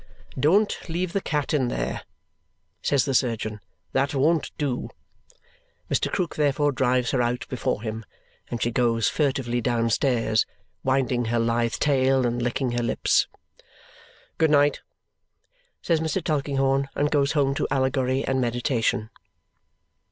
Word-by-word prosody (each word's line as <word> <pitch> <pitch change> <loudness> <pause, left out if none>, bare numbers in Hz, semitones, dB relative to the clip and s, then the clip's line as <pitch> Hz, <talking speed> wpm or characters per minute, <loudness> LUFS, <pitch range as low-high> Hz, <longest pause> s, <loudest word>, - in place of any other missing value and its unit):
"Don't 190 +7 +2
leave 175 +2 -2
the 200 - 0
cat 150 -5 -2
there!" 120 - -1 0.8
says 140 -3 +2
the 135 - -1
surgeon; 110 -4 0 0.3
"that 135 +2 +1
won't 155 +4 +2
do!" 140 -5 -2 1.0
Mr. - - +1
Krook 180 -3 -1
therefore 145 0 +2
drives 125 -2 +1
her 130 - +1
out 120 +1 -1
before 120 -4 -2
him, 110 0 -4 0.5
and 120 - -3
she 120 - 0
goes 115 -2 +2
furtively 130 -5 0
downstairs, 115 -1 +1 0.4
winding 130 -2 +1
her 115 +1 0
lithe 115 0 +1
tail 135 -2 +2
and 120 0 -1
licking 120 +1 -1
her 120 0 -1
lips. 115 - +2 1.1
"Good 160 -1 +4
night!" 145 -1 +3 1.0
says 165 -2 +2
Mr. 160 +3 -1
Tulkinghorn, 135 -3 0
and 145 +1 +1
goes 140 -1 +2
home 140 -3 +2
to - - -1
Allegory 130 0 +1
and 130 0 0
meditation. 120 -2 0
130 Hz, 130 wpm, -25 LUFS, 120-145 Hz, 1.1 s, Good